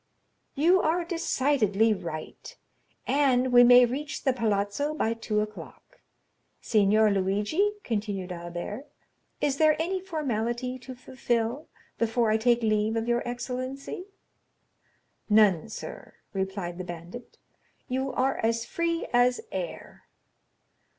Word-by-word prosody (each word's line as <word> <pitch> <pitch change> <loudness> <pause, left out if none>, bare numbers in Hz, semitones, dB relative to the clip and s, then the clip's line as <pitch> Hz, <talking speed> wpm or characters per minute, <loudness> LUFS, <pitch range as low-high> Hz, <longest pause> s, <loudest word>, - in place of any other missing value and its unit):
"You 350 +6 +4
are 335 +2 +1
decidedly 255 - +1
right, 155 -5 -7 0.5
and 260 -3 +2
we 245 0 +9
may 245 0 +8
reach 290 +5 -4
the 265 - +2
Palazzo 225 +5 -1
by 225 -6 0
two 220 -2 -1
o'clock. 215 0 -9 0.6
Signor 215 0 +3
Luigi," 205 - +1
continued 205 -4 -3
Albert, 175 +9 -6 0.5
"is 280 -2 +1
there 310 0 +4
any 370 +3 -1
formality 255 - -2
to 255 +1 -9
fulfil 245 +1 -2 0.3
before 230 0 +1
I 220 - +3
take 235 +1 +2
leave 215 0 +1
of 225 0 -1
your 240 0 +1
excellency?" 255 +7 -5 1.2
"None, 210 -3 +4
sir," - - -9 0.2
replied 190 -2 -3
the - - -3
bandit, 175 +7 -9 0.5
"you 265 +1 -2
are 265 +2 0
as 230 +1 0
free 335 0 -1
as 245 +1 +4
air." - - -6
240 Hz, 115 wpm, -27 LUFS, 210-270 Hz, 1.2 s, we